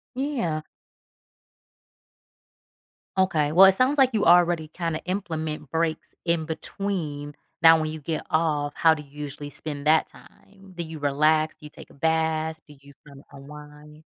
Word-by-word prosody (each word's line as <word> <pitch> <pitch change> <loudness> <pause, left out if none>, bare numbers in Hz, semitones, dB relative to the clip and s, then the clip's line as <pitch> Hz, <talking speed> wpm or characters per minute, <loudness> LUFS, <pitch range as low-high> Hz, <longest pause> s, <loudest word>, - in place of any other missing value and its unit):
Yeah. 245 - -2 2.6
Okay. 155 -6 +1
Well, 190 +3 +9
it 190 - +4
sounds 265 +5 +2
like 265 -2 +5
you 215 - +1
already 175 -2 +4
kinda 165 -1 -3
implement 160 -6 -4
breaks 165 -1 -1 0.2
in 170 -2 0
between. 160 -3 -4 0.3
Now 165 -1 +7
when 155 0 -2
you 155 -1 -7
get 155 +1 -4
off, 150 -3 0
how 160 -1 +5
do 150 -1 -7
you 140 - -21
usually 145 0 -7
spend 145 -1 -6
that 160 0 +4
time? 195 -1 -19
Do 170 - -4
you 160 -1 -8
relax? 155 +2 +2
Do 155 -1 -16
you - - -9
take - - -14
a - - -18
bath? 160 +1 0
Do 145 - -15
you 140 0 -16 0.2
kinda 140 -1 -14
unwind? 150 +2 -13
160 Hz, 155 wpm, -25 LUFS, 150-170 Hz, 2.6 s, Well